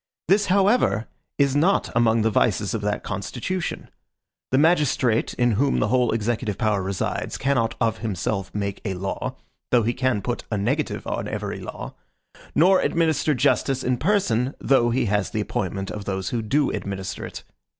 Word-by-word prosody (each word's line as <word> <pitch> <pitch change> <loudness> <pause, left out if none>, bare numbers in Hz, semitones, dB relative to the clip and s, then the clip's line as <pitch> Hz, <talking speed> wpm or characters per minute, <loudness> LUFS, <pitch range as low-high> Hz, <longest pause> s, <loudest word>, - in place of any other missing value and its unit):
This, 200 +4 +3
however, 195 - +3 0.3
is 140 -1 +2
not 175 +7 +2
among 115 -2 +3
the 110 - +2
vices 105 0 +1
of 110 - -2
that 105 0 -2
constitution. 120 - -4 0.6
The 130 - +2
magistrate 145 -7 +2
in 120 -1 +2
whom 135 +6 +2
the 105 - +1
whole 125 0 +2
executive 110 -2 -1
power 105 -1 +1
resides 95 0 -3
cannot 130 -5 +1
of 115 -1 0
himself 100 -2 -2
make 100 -1 -3
a 95 -4 -2
law, 95 +2 -4 0.3
though 120 -2 +4
he 120 +2 +1
can 125 -5 0
put 120 +2 -3
a 105 - -1
negative 100 - -1
on - - -3
every - - -4
law; - - -7 0.6
nor 185 +4 +5
administer 160 -2 +1
justice 135 0 +1
in 125 0 +1
person, 135 - +1
though 125 -3 +3
he 120 +2 +1
has 105 -1 0
the 110 - -2
appointment 95 -1 -3
of 105 -1 -6
those 95 -1 -2
who 120 - -1
do 135 +7 +1
administer 95 -2 -4
it. - - -7
115 Hz, 170 wpm, -24 LUFS, 105-140 Hz, 0.6 s, nor